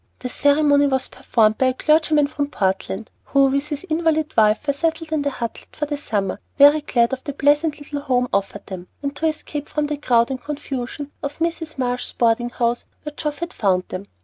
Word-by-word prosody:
The 250 - -5
ceremony 285 +1 +3
was 265 -2 -1
performed 215 -2 +1
by 260 - +4
a 255 - +2
clergyman 305 0 +3
from 285 0 -2
Portland, 190 -3 -2
who 275 -1 +4
with 280 +2 0
his 295 +1 -5
invalid 315 -1 0
wife 215 +5 +3
were 285 - +2
settled 325 +2 -2
in 310 -2 +1
the 285 - 0
Hutlet 240 -4 -6
for 300 - -1
the 295 0 -3
summer, 205 -9 -2 0.2
very 290 +2 +7
glad 240 -4 +1
of 260 - -4
the 285 - -4
pleasant 295 +2 +2
little 290 0 -5
home 250 -3 +1
offered 200 0 -1
them, 185 -2 -8 0.2
and 280 0 -2
to 320 - +1
escape 300 -1 -4
from 300 -1 -1
the 295 0 -2
crowd 240 -3 +2
and 260 -1 -4
confusion 280 -1 -5
of 285 0 -4
Mrs. 325 -2 -2
Marsh's 245 -1 -2
boarding 235 +1 +2
house, 240 -1 -1 0.2
where 300 - -6
Geoff 300 -1 -3
had 340 +1 -4
found 185 -3 +1
them. 190 +2 -6
285 Hz, 205 wpm, -21 LUFS, 240-300 Hz, 0.2 s, very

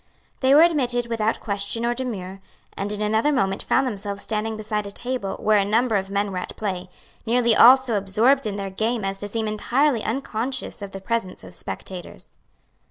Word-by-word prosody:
They 265 +1 +4
were 310 - +8
admitted 250 -8 +2
without 225 -2 -1
question 205 +3 -2
or 240 - +1
demur, 195 -7 -5 0.3
and 200 +1 -3
in 210 0 -1
another 220 +7 +2
moment 195 -8 +1
found 265 - +2
themselves 200 -4 -4
standing 220 0 -2
beside 210 -1 -3
a - - -6
table 245 -3 -3
where 215 -1 +3
a - - +2
number 225 +3 +1
of 195 -1 -1
men 200 0 -1
were 185 - -3
at - - -7
play, 185 -4 -4 0.4
nearly 235 -1 +3
all 250 +5 +9
so 260 -4 -3
absorbed 220 +7 +2
in 205 - -3
their 195 -1 -4
game 220 +2 -1
as 195 0 -3
to 205 - -4
seem 220 +1 -2
entirely 240 +4 +1
unconscious 250 0 -3
of 200 -1 -6
the 195 - -8
presence 210 - -3
of 90 -1 -12
spectators. 175 - -6
215 Hz, 195 wpm, -23 LUFS, 200-240 Hz, 0.4 s, all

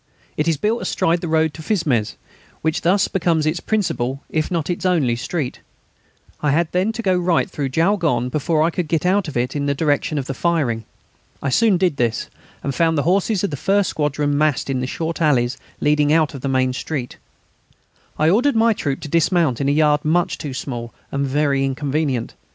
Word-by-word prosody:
It 150 - -1
is 165 -3 +2
built 220 +8 0
astride 170 +1 0
the 175 - -3
road 160 -1 +2
to 160 - -9
Fismes, 155 - 0 0.5
which 160 0 0
thus 185 +3 +3
becomes 170 -4 +1
its 155 +3 0
principal, 140 - -1
if 155 -1 0
not 170 -4 -1
its 175 - -3
only, 160 -10 +2
street. 130 +2 -3 0.8
I 150 - +1
had 160 +3 +1
then 185 +5 +1
to 230 - -5
go 190 -2 +2
right 175 -2 +1
through 140 -2 -3
Jaulgonne 160 - +1
before 155 +3 +1
I 165 - +2
could 175 -1 -2
get 165 +1 0
out 190 0 +2
of 150 - -4
it 125 +3 -1
in 145 -1 -1
the 140 - +1
direction 150 +1 0
of 135 - -2
the 135 - -4
firing. 135 -8 0 0.5
I 140 - -2
soon 210 - +3
did 175 -5 +1
this, 115 -2 -1 0.3
and 140 - -2
found 160 +4 +2
the 145 - +1
horses 195 +3 +1
of 200 - 0
the - - -2
first 195 +4 +1
squadron 145 -1 0
massed 145 -2 +1
in 130 - -1
the 130 - -2
short 165 +5 -4
alleys 130 -4 +2 0.2
leading 150 0 +2
out 155 -1 +3
of 135 - -7
the 135 - -2
main 130 -1 +1
street. 130 -2 -4 1.0
I 155 - +2
ordered 240 - +3
my 225 0 +4
troop 140 -9 -3
to - - -6
dismount 165 -4 +2
in 140 - +1
a - - +3
yard 150 0 +3
much 170 +1 +1
too 140 -4 -5
small 120 -4 -5 0.2
and 140 0 -1
very 140 0 +1
inconvenient. 135 -2 -1
155 Hz, 205 wpm, -20 LUFS, 135-175 Hz, 1.0 s, my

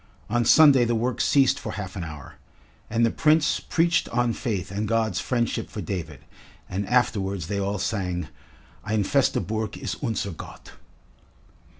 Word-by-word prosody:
On 120 +1 +2
Sunday 140 +1 +7
the 120 0 +1
work 120 +2 -1
ceased 135 -2 +3
for - - -6
half 95 -3 -6
an 90 - -4
hour, 75 -4 -9 0.5
and 115 +1 +2
the 115 - +1
Prince 155 0 +3
preached 170 0 +1
on 120 0 +1
faith 100 -9 -3
and 105 +2 -2
God's 110 -4 0
friendship 120 -1 -1
for - - -7
David, 80 -8 -5 0.5
and 95 +2 -3
afterwards 100 -7 +1
they 100 +4 -2
all 100 +1 -1
sang: 90 -5 -2 0.6
"Ein 105 0 0
feste 140 +6 +1
Burg 110 -1 -3
ist 105 - -5
unser 110 -5 -2
Gott." 80 - -11
110 Hz, 160 wpm, -25 LUFS, 95-120 Hz, 0.6 s, Sunday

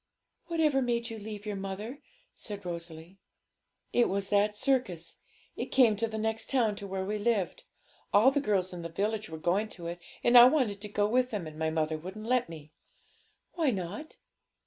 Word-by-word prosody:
'Whatever 310 -5 +2
made 235 -2 -1
you 225 - -6
leave 210 0 -7
your 210 -1 -3
mother?' 195 +7 -5 0.3
said 205 -3 -6
Rosalie. 170 +1 -7 0.7
'It 240 - +4
was 195 +1 -1
that 205 +1 +3
circus; 210 -10 -1 0.4
it - - -3
came 240 -5 +5
to 230 +2 0
the 220 0 -5
next 220 +1 -2
town 230 -6 +2
to 200 - -6
where 190 0 -3
we 210 +2 -2
lived. 205 -4 0 0.5
All 220 +6 +6
the 285 +1 +1
girls 190 -7 0
in 175 - -6
the 170 - -5
village 210 +5 -2
were 160 - -6
going 185 +7 +1
to 170 - -9
it, 170 +1 -4 0.2
and 240 - +4
I 240 - +11
wanted 250 -8 +2
to 210 - -6
go 205 0 +1
with 250 +3 +2
them, 205 -7 -3
and 155 0 -9
my 160 0 +1
mother 155 0 -1
wouldn't 190 +6 -8
let 245 -4 +1
me.' 155 -2 -10 0.8
'Why 325 -5 +1
not?' 200 - -4
210 Hz, 190 wpm, -30 LUFS, 180-235 Hz, 0.8 s, I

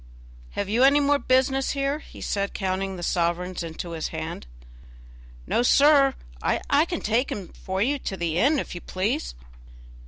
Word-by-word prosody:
Have 200 - -2
you 225 +5 +2
any 280 +2 +6
more 285 0 +3
business 265 +1 +2
here?" 280 +1 -1
he - - -13
said, 200 -1 -2
counting 190 0 -2
the 175 - -7
sovereigns 175 +1 -1
into 170 +1 -6
his 160 -2 -3
hand. - - -6 1.0
"No, - - +1
sir, 275 +1 +5 0.3
I 290 +3 +2
can 345 -1 -4
take 230 +5 0
him 190 -4 -5
for 190 +1 -3
you 280 +4 0
to 195 - -4
the 170 -1 -1
inn, 290 +7 +4
if - - -4
you 175 - -7
please." 185 - -2
210 Hz, 165 wpm, -25 LUFS, 180-275 Hz, 1.0 s, any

